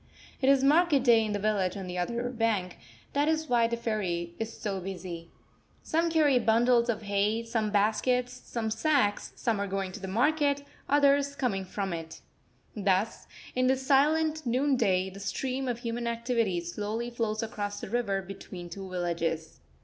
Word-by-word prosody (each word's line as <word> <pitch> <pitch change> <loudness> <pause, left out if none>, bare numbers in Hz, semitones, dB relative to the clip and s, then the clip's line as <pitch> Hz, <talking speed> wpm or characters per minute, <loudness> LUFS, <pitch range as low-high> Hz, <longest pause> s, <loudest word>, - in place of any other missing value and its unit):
It 265 - +4
is 275 -1 +5
market 295 -1 +4
day 235 -3 +5
in 215 - -2
the 205 - 0
village 200 -2 0
on 195 - -5
the 180 0 -4
other 235 +7 -1
bank; 220 -7 -1 0.3
that 285 +1 +2
is 315 0 +1
why 235 -3 +3
the 235 0 -2
ferry 185 -7 -2
is 225 0 -3
so 200 -4 -4
busy. 175 -3 -6 0.5
Some 330 +1 +1
carry 300 -5 +4
bundles 235 +1 +3
of 225 -1 -1
hay, 205 +3 +1
some 225 -2 -1
baskets, 230 +5 +1
some 235 -3 -4
sacks; 225 -3 +1
some 225 -3 -1
are 200 - -1
going 195 -1 -2
to 215 - -8
the 190 - -6
market, 285 +6 +2 0.3
others 280 0 +3
coming 200 -9 -1
from 190 0 -3
it. 165 -1 -7 0.5
Thus, 200 0 0 0.3
in 255 0 +2
this 265 0 +1
silent 310 +3 +3
noonday, 235 -8 +1
the 195 - -10
stream 260 +6 -2
of 245 -2 -1
human 235 0 -3
activity 230 -6 0
slowly 210 +7 -4
flows 225 -2 -1
across 205 -2 -4
the - - -6
river 200 -3 -1
between 185 -2 -9
two 195 +1 -7
villages. 170 -3 -2
225 Hz, 170 wpm, -29 LUFS, 195-255 Hz, 0.5 s, is